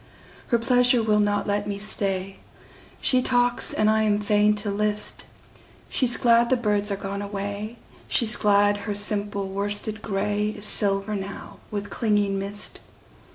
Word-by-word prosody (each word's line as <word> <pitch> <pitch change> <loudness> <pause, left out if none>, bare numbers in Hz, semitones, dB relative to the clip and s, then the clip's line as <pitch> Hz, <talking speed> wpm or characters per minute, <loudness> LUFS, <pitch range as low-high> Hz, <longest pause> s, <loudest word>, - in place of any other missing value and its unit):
Her 235 - +3
pleasure 245 0 +3
will 210 -1 +3
not 205 0 +1
let 205 0 -1
me 200 -1 -3
stay. 195 -2 -3 0.6
She 255 -1 +3
talks 245 -1 +2
and 215 - +1
I 220 0 +3
am 210 -1 +2
fain 210 0 +3
to 205 0 -2
list:She's 210 +4 -2
glad 235 0 +4
the 260 - +3
birds 210 -3 0
are - - 0
gone 200 0 -4
away, 205 +2 -5 0.3
She's 235 -1 +1
glad 205 -1 +3
her 205 0 -4
simple 205 -1 -2
worsted 205 +2 -3
grayIs 210 +1 -2
silver 200 0 +1
now 195 -1 -6
with 205 -1 -5
clinging 205 -3 +1
mist. 200 +1 -6
205 Hz, 145 wpm, -24 LUFS, 200-215 Hz, 0.6 s, glad